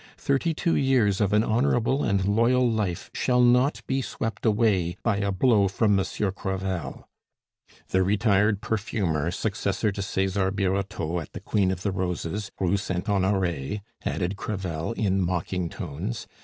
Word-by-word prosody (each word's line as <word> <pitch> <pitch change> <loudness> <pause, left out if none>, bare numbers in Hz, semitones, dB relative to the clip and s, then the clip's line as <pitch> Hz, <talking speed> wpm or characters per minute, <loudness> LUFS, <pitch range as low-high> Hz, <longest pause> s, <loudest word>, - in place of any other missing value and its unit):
Thirty 140 +4 0
two 170 +1 +1
years 120 -8 +2
of 100 -1 +2
an 105 +1 +4
honorable 120 +3 +1
and 100 -2 +1
loyal 115 +5 +3
life 105 -7 -2
shall 125 -1 +1
not 125 +3 +4
be 135 0 0
swept 115 -2 -3
away 100 -5 +2
by 115 -4 +1
a 100 0 0
blow 100 0 +3
from 105 +2 +2
Monsieur 95 +1 0
Crevel 95 -6 -4 0.4
" - - -30
"The 95 - +3
retired 100 +1 +2
perfumer, 95 -8 -1
successor 100 +2 -1
to 100 - -5
Cesar 95 0 0
Birotteau 95 -3 -1
at 80 - -9
the - - -6
Queen 100 -3 +1
of 95 -1 -3
the 100 - 0
Roses, 95 +2 -3
Rue 95 +1 +2
Saint 95 0 -3
Honore," 95 -5 0 0.3
added 90 +3 -2
Crevel, 95 -3 -3
in 95 -4 +1
mocking 90 0 -1
tones. 70 -9 -5
100 Hz, 155 wpm, -26 LUFS, 95-110 Hz, 0.4 s, an